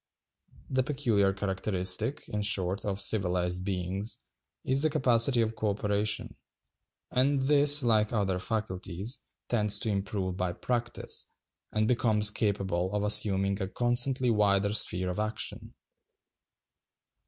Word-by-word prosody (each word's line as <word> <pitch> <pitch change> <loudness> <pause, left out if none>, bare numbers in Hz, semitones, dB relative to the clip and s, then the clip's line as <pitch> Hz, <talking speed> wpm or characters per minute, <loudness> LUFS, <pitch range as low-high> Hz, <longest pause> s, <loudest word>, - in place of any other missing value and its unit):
The 130 0 +2
peculiar 125 -8 +1
characteristic, 95 +4 -2
in 105 - -3
short, 100 -2 -1
of 100 -1 -2
civilized 90 -3 +1
beings, 95 +2 -2 0.5
is 135 +1 +1
the 155 - +3
capacity 125 -2 +3
of 115 0 -2
co 105 0 -1
operation; 105 +1 -2 0.7
and 135 +2 +1
this, 145 +1 +7
like 110 -3 +2
other 95 -5 -1
faculties, 105 +2 -3 0.3
tends 105 -3 +3
to 110 - 0
improve 95 -2 -3
by 90 -2 -2
practice, 120 +4 -2 0.4
and 110 0 0
becomes 110 -3 +3
capable 95 -4 -1
of 105 - -1
assuming 100 -1 +1
a 95 - -2
constantly 120 +3 +1
wider 100 -1 +2
sphere 90 -3 +1
of 90 - -5
action. 110 +1 -5
105 Hz, 120 wpm, -28 LUFS, 95-120 Hz, 0.7 s, this